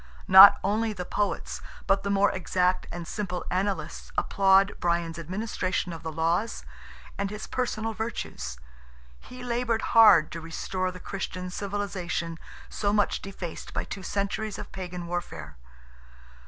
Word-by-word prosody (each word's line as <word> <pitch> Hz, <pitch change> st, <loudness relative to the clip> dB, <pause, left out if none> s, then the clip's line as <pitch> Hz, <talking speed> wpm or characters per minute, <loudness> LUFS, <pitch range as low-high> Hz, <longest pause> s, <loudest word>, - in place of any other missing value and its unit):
Not 190 Hz, +1 st, +10 dB
only 215 Hz, +3 st, 0 dB
the 180 Hz, -3 st, -5 dB
Poets, 205 Hz, +2 st, -2 dB, 0.2 s
but 195 Hz, 0 st, +2 dB
the 200 Hz, -, -3 dB
more 200 Hz, 0 st, +3 dB
exact 185 Hz, 0 st, 0 dB
and 170 Hz, -1 st, -6 dB
simple 180 Hz, -4 st, -4 dB
Annalists 185 Hz, -4 st, -2 dB
applaud 195 Hz, 0 st, +4 dB
Brian's 170 Hz, -1 st, -1 dB
administration 185 Hz, 0 st, -2 dB
of 165 Hz, -, -8 dB
the 160 Hz, -, -5 dB
laws, 165 Hz, +8 st, -1 dB, 0.5 s
and 200 Hz, 0 st, -1 dB
his 210 Hz, +1 st, -6 dB
personal 225 Hz, -3 st, -2 dB
virtues. 220 Hz, -, -5 dB, 0.6 s
He 250 Hz, 0 st, -11 dB
laboured 235 Hz, -2 st, -1 dB
hard 215 Hz, -9 st, +7 dB
to 165 Hz, -, -6 dB
restore 185 Hz, +3 st, -3 dB
the 180 Hz, 0 st, -9 dB
Christian 185 Hz, -1 st, -5 dB
civilization, 185 Hz, -5 st, -3 dB, 0.3 s
so 205 Hz, -1 st, -1 dB
much 205 Hz, 0 st, +1 dB
defaced 190 Hz, -4 st, -7 dB
by -, -, 0 dB
two 195 Hz, -, -7 dB
centuries 200 Hz, +2 st, -2 dB
of -, -, -8 dB
Pagan 180 Hz, -2 st, -6 dB
warfare. 170 Hz, -, -5 dB
190 Hz, 140 wpm, -27 LUFS, 175-205 Hz, 0.6 s, Not